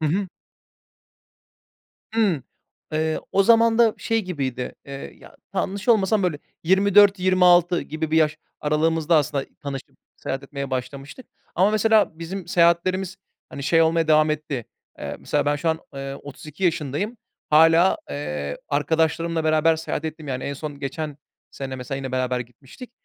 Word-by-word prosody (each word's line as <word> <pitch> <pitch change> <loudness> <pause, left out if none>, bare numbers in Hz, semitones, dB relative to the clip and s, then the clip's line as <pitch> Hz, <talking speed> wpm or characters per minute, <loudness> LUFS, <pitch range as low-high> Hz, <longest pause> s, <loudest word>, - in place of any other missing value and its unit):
Hı 155 - +1
hı. 190 +5 0 1.9
Hımm, 200 - +2 0.5
eee. 155 0 0
O 195 - +4
zaman 230 +1 +4
da 230 -2 +5
şey 225 -1 0
gibiydi, 135 -8 -4
eee 140 0 -8
ya - - -16 0.2
t - - -2
yanlış 200 +5 -3
olmasam 215 -2 +3
böyle 175 -5 0 0.3
24-26 185 -2 +5
gibi 155 +2 -4
bir 160 - +2
yaş 155 -2 +2 0.2
aralığımızda 160 +2 +2
aslında 140 -2 0 0.2
tanışıp 140 -2 -7 0.2
seyahat 135 +1 -4
etmeye 140 0 -6
başlamıştık 135 - -6 0.3
ama 190 +4 +4
mesela 215 -5 +3
bizim 175 +2 -6
seyahatlerimiz 180 +1 +2 0.3
hani 140 - -8
şey 165 +3 +4
olmaya 160 0 +2
devam 155 0 +5
etti, 150 -5 -3 0.3
eee, - - -5
mesela 145 0 -1
ben 145 0 +2
şu 165 +3 -1
an, 160 0 +1 0.2
eee, 135 0 -5
32 150 +5 -8
yaşındayım, 165 - -1 0.3
hâlâ, 165 +4 +6
eee, 70 0 -4
arkadaşlarımla 160 +2 0
beraber 155 +1 +3
seyahat 160 -1 -4
ettiğim 155 -1 -6
yani, 130 -1 -3
en 140 - -3
son 145 0 -7
geçen 145 +1 -4 0.3
sene 135 -1 -6
mesela 125 +1 -5
yine 135 -1 -5
beraber 130 -1 0
gitmiştik. 130 - -11
160 Hz, 150 wpm, -23 LUFS, 140-185 Hz, 1.9 s, hâlâ